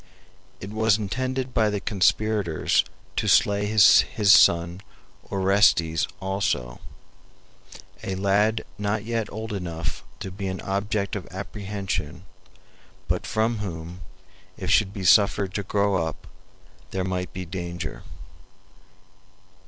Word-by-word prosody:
It 95 - -8
was 110 -1 +2
intended 130 +5 -3
by 110 -1 +3
the 105 -1 -2
conspirators 100 -2 +1 0.3
to - - 0
slay 100 0 +3
his 105 -2 +7 0.3
son 85 -2 +5 0.5
Orestes 95 -4 +3
also, 95 -11 -2 1.2
a 95 - -3
lad 100 +3 +1
not 105 +1 -1
yet 115 -2 -2
old 110 +1 -5
enough 85 -6 -4 0.2
to 95 - -5
be 95 +1 -5
an 95 0 -4
object 100 +1 -2
of 100 - -6
apprehension, 95 -4 -5 0.8
but - - -1
from 110 +1 0
whom, 85 -2 -6 0.6
if - - -3
he - - +7
should 100 -3 +2
be 100 -2 -6
suffered 95 +1 +4
to 100 - -1
grow 100 -3 +1
up, 80 -1 -6 0.6
there 95 0 -2
might 90 -1 -3
be 90 0 -6
danger. 85 -2 -6
100 Hz, 120 wpm, -24 LUFS, 90-105 Hz, 1.2 s, his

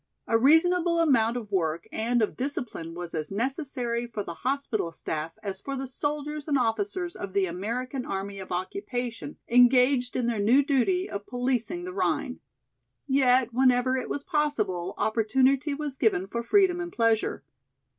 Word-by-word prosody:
A 225 - 0
reasonable 335 +7 +4
amount 245 -8 +3
of 215 -4 -7
work 165 -3 -1
and 235 +1 +1
of 210 - -2
discipline 245 - -4
was 175 -1 -6
as 155 +1 -3
necessary 240 0 -2
for 215 -3 -4
the 170 - -6
hospital 255 -7 -2
staff 160 0 -4
as 195 -2 -4
for 275 - -4
the 270 - -3
soldiers 295 +2 -3
and 290 -2 +2
officers 345 - -1
of 195 -2 -6
the 200 -1 +2
American 235 +9 -3
Army 195 -1 -4
of 190 - -9
Occupation 245 - -4
engaged 250 +1 +4
in 250 - 0
their 235 -3 0
new 245 +7 +4
duty 320 +7 +1
of 200 0 -6
policing 250 +7 -1
the 365 +1 -6
Rhine. 380 - -1 0.7
Yet 255 -3 +3
whenever 255 0 +3
it 260 - -3
was 285 - -3
possible 290 - -1
opportunity 265 +6 +2
was 290 -2 -5
given 200 -5 +2
for 235 +4 -4
freedom 360 - +3
and 345 0 -5
pleasure. 230 -4 +1
250 Hz, 160 wpm, -27 LUFS, 215-285 Hz, 0.7 s, reasonable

